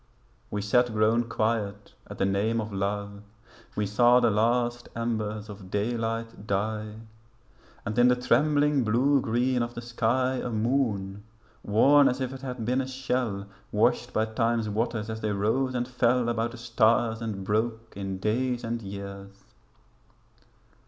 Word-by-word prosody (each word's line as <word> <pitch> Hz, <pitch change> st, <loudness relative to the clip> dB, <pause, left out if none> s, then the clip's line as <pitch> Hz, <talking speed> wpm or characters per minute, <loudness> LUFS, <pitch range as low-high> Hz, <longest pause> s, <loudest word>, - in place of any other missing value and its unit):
We 105 Hz, -1 st, -3 dB
sat 120 Hz, +4 st, +3 dB
grown 110 Hz, +2 st, +2 dB
quiet 110 Hz, -3 st, -2 dB
at -, -, -9 dB
the -, -, +1 dB
name 100 Hz, +4 st, +1 dB
of 110 Hz, -1 st, -4 dB
love. 100 Hz, +1 st, -3 dB, 0.5 s
We 105 Hz, -, 0 dB
saw 120 Hz, +5 st, +5 dB
the 120 Hz, -2 st, +3 dB
last 120 Hz, +3 st, +1 dB
embers 110 Hz, -2 st, -2 dB
of 100 Hz, -3 st, -10 dB
daylight 115 Hz, +1 st, -2 dB
die 105 Hz, +2 st, -2 dB, 0.8 s
And 110 Hz, +2 st, -1 dB
in 120 Hz, -, +6 dB
the 125 Hz, -, +5 dB
trembling 145 Hz, +3 st, +2 dB
blue 130 Hz, +5 st, +3 dB
green 125 Hz, +2 st, +1 dB
of 120 Hz, 0 st, -3 dB
the 120 Hz, -, -5 dB
sky 120 Hz, +2 st, 0 dB
A 125 Hz, -, -3 dB
moon, 110 Hz, -4 st, -1 dB, 0.4 s
worn 140 Hz, +7 st, +5 dB
as 125 Hz, -, -2 dB
if 130 Hz, 0 st, -3 dB
it 130 Hz, -, -9 dB
had 125 Hz, -4 st, -5 dB
been 125 Hz, +3 st, +1 dB
a 130 Hz, -, -4 dB
shell 125 Hz, -6 st, -2 dB, 0.3 s
Washed -, -, +2 dB
by 110 Hz, -, +1 dB
time's 115 Hz, 0 st, 0 dB
waters 110 Hz, 0 st, -1 dB
as 110 Hz, 0 st, -5 dB
they 110 Hz, -, -1 dB
rose 125 Hz, +6 st, 0 dB
and 120 Hz, 0 st, -1 dB
fell 125 Hz, -1 st, +2 dB
About 115 Hz, 0 st, 0 dB
the -, -, -9 dB
stars 115 Hz, -1 st, +2 dB
and 105 Hz, -4 st, -4 dB
broke 110 Hz, +2 st, -1 dB
in 95 Hz, -1 st, -4 dB
days 120 Hz, +5 st, -1 dB
and 115 Hz, 0 st, -3 dB
years. 100 Hz, 0 st, -8 dB
115 Hz, 155 wpm, -27 LUFS, 105-125 Hz, 0.8 s, in